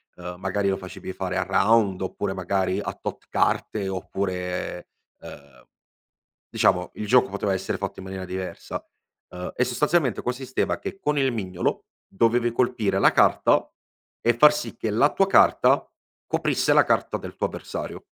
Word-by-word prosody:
ehm, 90 0 -7
magari 100 +1 0
lo 95 - 0
facevi 95 0 -8
fare 95 0 -3
a 90 - +1
round 95 +1 +2
oppure 95 +1 -3
magari 95 0 -1
a - - -4
tot - - -7
carte 100 -3 0
oppure, 90 -2 -4 0.3
ehm 70 -3 -13 0.8
diciamo 90 0 +2
il 105 - -5
gioco 125 0 +4
poteva 100 0 -1
essere 95 0 -2
fatto 100 -1 -5
in 95 - -8
maniera 95 -1 -6
diversa. 95 0 -6 0.5
Ehm, 90 0 -6
e - - +2
sostanzialmente 145 0 +1
consisteva 130 +1 -2
che 195 0 -6
con 150 -5 0
il 135 -2 +2
mignolo, 95 -5 -2 0.2
dovevi 115 +3 +2
colpire 110 -5 0
la - - +5
carta, - - +3 0.5
e 120 - +3
far 150 +6 +6
sì 135 -6 -5
che 110 - -2
la 120 +8 +3
tua 195 - +3
carta - - +4 0.4
coprisse - - +1
la - - +6
carta - - 0
del - - -9
tuo - - -1
avversario. - - -7
100 Hz, 160 wpm, -24 LUFS, 95-120 Hz, 0.8 s, far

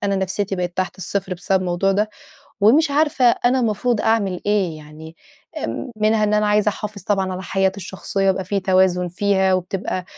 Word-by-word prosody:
نفسيتي 195 +1 -2
بقت 180 0 -4
تحت 185 0 -2
الصفر 190 0 -3
بسبب 190 +1 0
الموضوع 185 +2 0
ده، 210 +2 0 0.5
ومش 285 +9 +4
عارفة 290 -3 +1
أنا 245 +2 +3
المفروض 230 0 0
أعمل 200 -5 0
إيه؟ 195 -6 +1
يعني 155 +2 -12 0.5
إمم 255 - -4
منها 215 0 +2
إن 210 - +1
أنا 210 0 +2
عايزة 210 0 +3
أحافظ 205 -2 -7
طبعًا 195 -2 0
على 185 +1 -5
حياتي 190 0 0
الشخصية، 195 +1 -2
يبقى 190 0 0
في 195 +1 -1
توازن 185 -1 +2
فيها، 190 +1 +1
وبتبقى 185 0 -3
195 Hz, 170 wpm, -20 LUFS, 185-210 Hz, 0.5 s, ومش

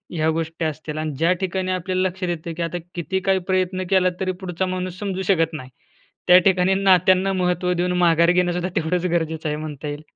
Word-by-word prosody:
ह्या 160 -1 +1
गोष्टी 165 +1 -2
असतील 155 0 -4
आणि 155 0 -2
ज्या 165 +4 +2
ठिकाणी 185 0 -2
आपल्याला 185 +1 0
लक्षात 185 0 -4
येतय 170 -1 -4
की 170 - -6
आता 165 +1 -3 0.2
किती 180 +2 -2
काही 190 0 +1
प्रयत्न 185 0 0
केला 185 -1 +4
तरी 185 -1 -1
पुढचा 185 0 -2
माणूस 185 -1 -4
समजू 195 -2 -3
शकत 165 -3 +1
नाही, 130 -5 -7 0.6
त्या 180 0 +8
ठिकाणी 190 0 +3
नात्यांना 190 0 +3
महत्त्व 180 -1 0
देऊन 180 0 0
माघार 170 -1 +4
घेणंसुद्धा 180 0 +1
तेवढंच 175 +1 0
गरजेचं 160 -2 -1
आहे 150 - -1
म्हणता 150 -1 -6
येईल. 145 +1 -6
180 Hz, 195 wpm, -22 LUFS, 165-185 Hz, 0.6 s, त्या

